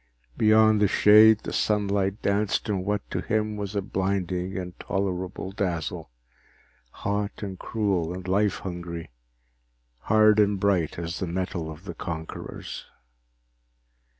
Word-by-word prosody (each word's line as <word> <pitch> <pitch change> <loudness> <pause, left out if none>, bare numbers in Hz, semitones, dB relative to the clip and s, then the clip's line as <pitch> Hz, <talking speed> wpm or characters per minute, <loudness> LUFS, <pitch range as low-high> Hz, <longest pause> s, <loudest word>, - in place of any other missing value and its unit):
Beyond 110 0 +5
the 105 - +5
shade, 110 +2 +6
the - - -5
sunlight 100 -1 0
danced 100 +2 0
in 100 -4 -1
what 105 +1 -2
to 95 - -1
him 105 +2 -1
was 105 0 -5
a 100 - 0
blinding, 95 -1 -2
intolerable 95 +1 -3
dazzle, 90 -9 -3 0.8
hot 100 - -3
and 95 -2 -6
cruel 95 -7 -1
and 90 0 -7
life 100 +2 +2
hungry, 85 -4 -6 0.9
hard 110 - +4
and 100 -1 +3
bright 95 -5 +1
as 85 +1 -4
the 95 - -2
metal 90 -2 -3
of 80 +2 -10
the 85 - -5
conquerors. 80 -1 -7
95 Hz, 125 wpm, -26 LUFS, 90-105 Hz, 0.9 s, shade